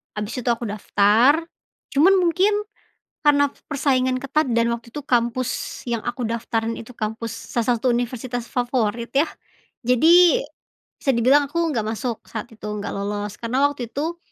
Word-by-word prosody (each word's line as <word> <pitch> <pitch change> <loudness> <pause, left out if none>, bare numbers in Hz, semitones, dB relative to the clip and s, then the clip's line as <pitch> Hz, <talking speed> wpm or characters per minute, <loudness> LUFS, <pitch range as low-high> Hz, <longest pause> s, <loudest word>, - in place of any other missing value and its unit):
habis 210 +1 -4
itu 250 - -8
aku 235 - -6
daftar. 210 +5 +4 0.6
Cuman 325 +8 +6
mungkin, 365 +4 +3 0.7
karena 285 -1 +4 0.2
persaingan 260 -3 +1
ketat 300 +3 +1
dan 235 0 +2
waktu 235 0 -5
itu 295 - -3
kampus 245 0 -1
yang 235 -1 0
aku 245 +1 -3
daftarin 230 0 -2
itu 230 +2 -10
kampus 220 +1 -4 0.2
salah 240 0 +1
satu 245 +2 +1
universitas 245 0 -3
favorit 240 -2 -1
ya. 285 +4 +3 0.6
Jadi, 335 - +6 0.6
bisa 275 - +1
dibilang 265 +5 +4
aku 320 - -5 0.2
nggak 225 -4 -1
masuk 225 +1 -3
saat 225 +2 -6
itu, 215 -1 -12
nggak 210 -1 -4
lolos. 205 +1 -3
Karena 255 +4 +1
waktu 260 -4 -6
itu, 320 +7 -3
240 Hz, 150 wpm, -22 LUFS, 225-280 Hz, 0.7 s, Cuman